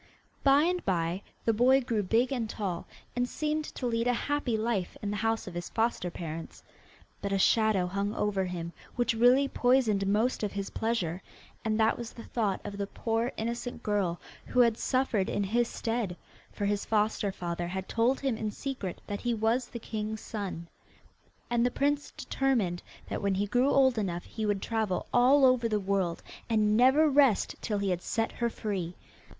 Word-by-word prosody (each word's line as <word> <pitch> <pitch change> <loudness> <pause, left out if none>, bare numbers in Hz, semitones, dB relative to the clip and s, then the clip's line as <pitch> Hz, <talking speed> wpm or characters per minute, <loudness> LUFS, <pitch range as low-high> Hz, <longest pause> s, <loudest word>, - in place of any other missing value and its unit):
By 280 +1 +6
and 360 +1 0
by 175 -1 0 0.2
the 225 - +3
boy 255 +4 +5
grew 230 -4 0
big 225 +7 +2
and 235 -5 -1
tall, 190 -6 -3 0.3
and 245 0 0
seemed 305 0 -1
to 260 - -6
lead 230 0 0
a 245 - +3
happy 275 -2 -1
life 215 -5 -1
in 205 - -1
the 210 - -2
house 225 +1 0
of 185 - -7
his 175 0 -5
foster 225 -5 0
parents. 165 -1 -7 0.6
But 200 - -3
a 195 - +2
shadow 215 -1 +3
hung 200 +3 -2
over 200 -2 0
him 170 -2 -5 0.2
which 240 -1 +1
really 245 +4 +5
poisoned 245 -7 +2
most 215 +5 +1
of 210 -2 -2
his 200 0 -4
pleasure, 195 -6 -1 0.4
and 220 0 0
that 220 +1 +3
was 235 -1 -6
the 230 - -9
thought 210 -5 -1
of 205 -1 -6
the 200 - -1
poor 225 +3 -1
innocent 235 +2 -4
girl 195 -5 0 0.3
who 250 - +3
had 235 -2 +4
suffered 245 -6 0
in 205 - 0
his 235 +5 +1
stead, 225 -8 -2 0.3
for 205 - -3
his 205 0 0
foster 210 -2 +1
father 175 -2 -4
had 190 +1 -4
told 235 +4 +1
him 265 -5 0
in 220 -1 -2
secret, 220 -6 -5
that 205 0 -4
he 240 -1 0
was 225 +3 +1
the 240 - -7
king's 220 -1 -4
son. 195 -6 -5 0.8
And 235 -1 +1
the 245 - +3
prince 285 +3 0
determined 225 -11 0 0.3
that - - -3
when 200 -1 +1
he 200 +2 +1
grew 245 +6 +2
old 260 -4 +4
enough 175 -4 -2
he 220 -1 -4
would 205 -2 0
travel 220 -5 -1
all 265 +3 +6
over 250 -3 +4
the 210 -1 +1
world, 190 -3 -1 0.3
and 215 -2 +3
never 265 +7 +5
rest 275 -6 +4
till 210 -3 -1
he 200 -1 0
had 180 -1 -1
set 225 +3 -1
her 235 -1 -1
free. 190 -6 -4
220 Hz, 190 wpm, -29 LUFS, 195-245 Hz, 0.8 s, By